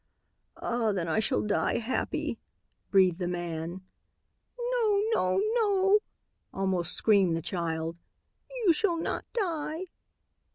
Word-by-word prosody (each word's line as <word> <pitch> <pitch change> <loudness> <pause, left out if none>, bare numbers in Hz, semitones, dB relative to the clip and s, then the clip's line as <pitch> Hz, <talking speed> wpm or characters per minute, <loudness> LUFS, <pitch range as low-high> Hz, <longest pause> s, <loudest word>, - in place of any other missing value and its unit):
"Ah, 235 -2 0
then 180 -4 -2
I 160 - +1
shall 220 - +1
die 210 -1 +1
happy," 235 +3 -2 0.5
breathed 185 -3 +4
the 180 - -1
man. 175 0 -4 0.8
"No! 475 -4 +1
No! 185 - +2
No!" 405 -3 +4 0.5
almost 185 -3 +1
screamed 195 -6 +3
the - - -3
child. 165 -2 -3 0.7
"You 345 - +6
shall 345 +1 +1
not 330 - -3
die." 330 -6 -2
205 Hz, 115 wpm, -29 LUFS, -, 0.8 s, You